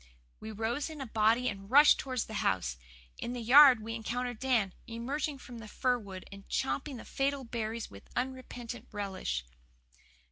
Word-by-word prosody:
We 220 - -7
rose 225 +8 -2
in 310 -2 -8
a 270 - -4
body 225 +2 +2
and 195 -2 -5
rushed 290 +4 +7
towards 255 -4 -2
the 220 - -9
house. 60 -10 0 0.4
In 240 - -4
the 250 - -4
yard 250 0 +8
we 225 +1 -4
encountered 240 +1 -3
Dan, 235 -8 +1
emerging 270 +6 -3
from 245 -2 -10
the 220 - -9
fir 250 +3 0
wood 190 -4 -9
and 195 0 -12
champing 270 0 -1
the - - -10
fatal 275 0 -1
berries 230 -1 -4
with 100 0 -13
unrepentant 250 -2 -5
relish. 190 - -3
235 Hz, 170 wpm, -31 LUFS, 215-260 Hz, 0.4 s, yard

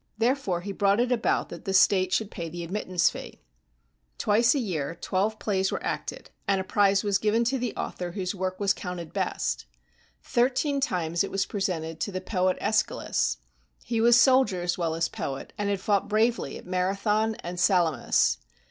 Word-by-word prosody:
Therefore 230 -7 0
he 200 +3 -5
brought 200 +1 +2
it 245 +1 +1
about 235 -2 +1
that 170 - -9
the 195 - -1
state 185 -1 +4
should 215 +1 0
pay 170 -3 -5
the 170 +1 -6
admittance 185 0 +1
fee. - - -9 0.8
Twice 230 +6 +3
a - - +1
year 165 - -3
twelve 205 +5 0
plays 195 -3 0
were - - -3
acted, - - -4 0.2
and 195 -1 +2
a - - -2
prize 195 +1 +3
was 200 -2 +1
given 220 +3 +2
to 260 +3 0
the 245 0 -1
author 180 - -4
125 175 - -8
GREECE - - -16 0.2
whose 195 - -10
work 185 0 -2
was 200 -1 +2
counted 180 -3 -6
best. - - -2 0.6
Thirteen 270 +3 +1
times 175 - 0
it 195 - -4
was 195 0 0
presented 165 -5 -3
to 205 - -2
the 185 - -3
poet 185 -1 0
^schylus. - - 0 0.5
He 230 -2 -1
was 235 +1 +6
soldier 255 -8 +4
as 175 0 0
well 165 -2 -1
as 165 0 +1
poet, 135 -1 -6
and 205 -1 -2
had 200 -1 0
fought 200 +1 +1
bravely 225 +3 +1
at - - -12
Marathon 200 +4 0
and 175 -2 -7
Sala 175 - +2
mis. - - +3
195 Hz, 190 wpm, -27 LUFS, 180-220 Hz, 0.8 s, was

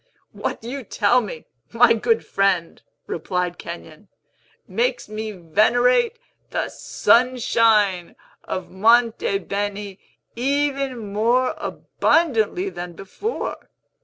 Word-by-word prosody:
"What - - -4
you 260 +3 -5
tell 230 +3 +2
me, 185 -8 -7 0.3
my 230 0 +5
good 450 - +1
friend," 195 -4 0 0.2
replied 180 +1 -3
Kenyon, 170 +1 -9 0.6
"makes - - -1
me 215 +1 -5
venerate 245 - +2 0.3
the - - -2
Sunshine 225 -7 +2 0.3
of 185 - -5
Monte 225 +1 +3
Beni 200 0 -4 0.4
even 270 -4 -1
more 240 +5 +2
abundantly 325 - 0
than 175 - -7
before. 195 - -5
220 Hz, 95 wpm, -22 LUFS, 195-255 Hz, 0.6 s, my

